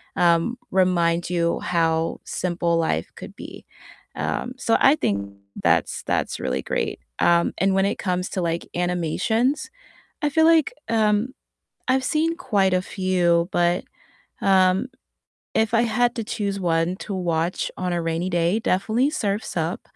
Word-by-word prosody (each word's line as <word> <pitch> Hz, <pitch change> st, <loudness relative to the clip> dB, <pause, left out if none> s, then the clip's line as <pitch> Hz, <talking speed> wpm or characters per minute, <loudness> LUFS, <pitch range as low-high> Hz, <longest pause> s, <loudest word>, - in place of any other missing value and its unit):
um, 170 Hz, +8 st, +2 dB
remind 175 Hz, -2 st, +2 dB
you 170 Hz, -1 st, 0 dB
how 165 Hz, -1 st, 0 dB
simple 170 Hz, -1 st, -1 dB
life 165 Hz, -1 st, -1 dB
could -, -, -10 dB
be. -, -, -10 dB, 0.5 s
Um, 250 Hz, -, -3 dB
so 230 Hz, -2 st, +2 dB
I 275 Hz, +3 st, +6 dB
think 100 Hz, -, -2 dB, 0.3 s
that's -, -, +2 dB
that's -, -, -1 dB
really 65 Hz, -, -2 dB
great. -, -, -2 dB, 0.2 s
Um, 170 Hz, 0 st, +3 dB
and 190 Hz, +1 st, +2 dB
when 195 Hz, 0 st, +3 dB
it 200 Hz, -, -1 dB
comes 180 Hz, -1 st, -1 dB
to, 185 Hz, -, -2 dB
like, 170 Hz, 0 st, -2 dB
animations, 180 Hz, -, 0 dB, 0.5 s
I 295 Hz, -, +1 dB
feel 320 Hz, +2 st, +3 dB
like, 325 Hz, -2 st, +4 dB, 0.2 s
um, 220 Hz, +2 st, +2 dB, 0.5 s
I've 260 Hz, 0 st, +2 dB
seen 320 Hz, +4 st, +1 dB
quite 195 Hz, -5 st, +1 dB
a 180 Hz, -, +2 dB
few, 180 Hz, -3 st, +1 dB
but, 175 Hz, +1 st, +1 dB, 0.6 s
um, 190 Hz, +3 st, +3 dB, 0.7 s
if 220 Hz, -1 st, +1 dB
I 230 Hz, -, +4 dB
had 240 Hz, +1 st, +1 dB
to 230 Hz, -, -2 dB
choose 200 Hz, -3 st, -3 dB
one 170 Hz, +1 st, +1 dB
to 205 Hz, -, -5 dB
watch 170 Hz, -1 st, -1 dB
on 180 Hz, -1 st, -2 dB
a 175 Hz, -1 st, -1 dB
rainy 165 Hz, +2 st, -1 dB
day, 175 Hz, +3 st, +1 dB
definitely 220 Hz, +7 st, +1 dB
Surf's 205 Hz, -6 st, -2 dB
Up. 165 Hz, +2 st, -1 dB
185 Hz, 150 wpm, -23 LUFS, 170-220 Hz, 0.7 s, I